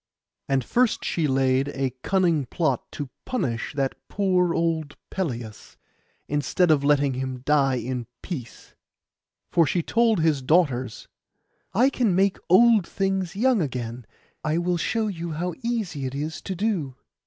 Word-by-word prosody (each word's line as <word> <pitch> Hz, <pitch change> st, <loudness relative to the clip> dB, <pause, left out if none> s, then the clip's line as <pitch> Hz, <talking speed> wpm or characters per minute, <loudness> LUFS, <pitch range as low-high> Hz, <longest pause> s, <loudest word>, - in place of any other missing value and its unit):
And 135 Hz, -2 st, +2 dB
first 245 Hz, -2 st, +1 dB
she 160 Hz, -3 st, 0 dB
laid 135 Hz, 0 st, +2 dB
a 135 Hz, -2 st, -2 dB
cunning 170 Hz, -8 st, +1 dB
plot 160 Hz, +5 st, -1 dB
to 145 Hz, -4 st, -5 dB
punish 130 Hz, -, -2 dB
that 135 Hz, -2 st, 0 dB, 0.2 s
poor 185 Hz, -3 st, +2 dB
old 160 Hz, -3 st, -1 dB
Pelias, 120 Hz, -, -5 dB, 0.5 s
instead 150 Hz, +4 st, +2 dB
of 145 Hz, -2 st, +3 dB
letting 140 Hz, -1 st, +3 dB
him 130 Hz, -1 st, -4 dB
die 140 Hz, -3 st, +3 dB
in 125 Hz, 0 st, -3 dB, 0.2 s
peace. 130 Hz, -11 st, -7 dB, 0.8 s
For 165 Hz, -3 st, +4 dB
she 175 Hz, +2 st, 0 dB
told 230 Hz, -1 st, +2 dB
his 155 Hz, -4 st, +2 dB
daughters, 130 Hz, -5 st, +1 dB, 0.7 s
'I 255 Hz, +6 st, +4 dB
can 225 Hz, -10 st, +1 dB
make 195 Hz, +1 st, +2 dB
old 215 Hz, 0 st, +6 dB
things 195 Hz, -2 st, -1 dB
young 240 Hz, 0 st, +3 dB
again; 125 Hz, -5 st, -4 dB, 0.4 s
I 155 Hz, +1 st, 0 dB
will 175 Hz, 0 st, 0 dB
show 225 Hz, +6 st, 0 dB
you 170 Hz, -5 st, -4 dB
how 175 Hz, +3 st, -2 dB
easy 220 Hz, -, -2 dB
it 130 Hz, -, -6 dB
is 155 Hz, +3 st, -4 dB
to 190 Hz, -, -4 dB
do. 180 Hz, -, -1 dB
160 Hz, 145 wpm, -25 LUFS, 135-190 Hz, 0.8 s, old